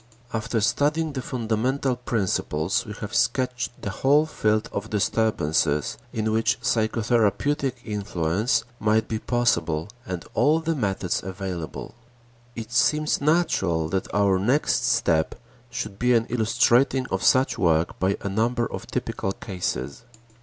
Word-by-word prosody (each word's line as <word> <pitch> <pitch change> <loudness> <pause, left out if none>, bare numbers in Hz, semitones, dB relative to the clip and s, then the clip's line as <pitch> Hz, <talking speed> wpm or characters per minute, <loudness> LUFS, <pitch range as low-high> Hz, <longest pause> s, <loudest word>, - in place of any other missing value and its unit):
After 115 +1 -1
studying 150 +7 +1
the 130 - -3
fundamental 125 +3 -1
principles, 95 -8 -1
we 105 - -5
have 105 - -5
sketched 120 0 0
the 100 - -2
whole 140 +8 +3
field 110 -8 0
of 100 +2 -4
disturbances 80 - +1 0.2
in 110 -1 -1
which 110 +3 +1
psychotherapeutic 120 +3 +1
influence 105 0 0 0.2
might 110 +1 +2
be 110 - -2
possible 85 -10 0
and 90 -4 -5
all 155 +3 +3
the 165 0 -1
methods 100 - -1
available. 95 -3 -6 0.6
It 115 -1 -7
seems 150 +6 +2
natural 95 - +1
that 95 +2 -2
our 100 -2 +3
next 125 +10 +1
step 80 -2 +1 0.3
should 100 -4 -5
be 125 0 +3
an 115 -1 +2
illustrating 125 +3 +3
of - - -1
such 130 +1 +3
work 80 -2 +1
by 95 +2 +1
a - - -4
number 115 +4 0
of - - -7
typical 95 - -3
cases. 90 - -4
110 Hz, 130 wpm, -24 LUFS, 95-125 Hz, 0.6 s, whole